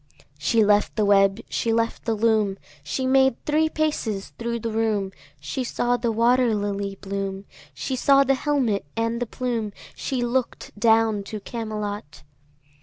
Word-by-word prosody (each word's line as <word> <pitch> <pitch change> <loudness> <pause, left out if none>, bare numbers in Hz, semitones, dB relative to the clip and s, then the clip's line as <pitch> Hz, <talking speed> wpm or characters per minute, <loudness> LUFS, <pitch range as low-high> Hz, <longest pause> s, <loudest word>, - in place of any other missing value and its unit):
She 215 +8 +3
left 205 0 +3
the 215 -1 +2
web, 195 +1 +4
she 230 - -1
left 230 0 -1
the 225 -1 +1
loom, 215 -3 +2 0.3
She 205 - -2
made 265 -1 +4
three 310 +1 +2
paces 295 -11 -2
thro' 235 0 -2
the 230 0 -4
room, 215 -3 0 0.3
She 260 - -3
saw 245 0 0
the 235 -1 -1
water 235 +1 +3
lily 200 -1 -2
bloom, 195 0 -4 0.3
She 265 - -3
saw 275 +2 +5
the 270 0 +2
helmet 260 -7 0
and 230 +1 -1
the 245 - -1
plume, 230 -4 -3 0.2
She 255 -3 -2
look'd 240 +1 -2
down 220 -1 +3
to 215 +1 -6
Camelot. 210 -7 -5
225 Hz, 155 wpm, -24 LUFS, 205-245 Hz, 0.3 s, saw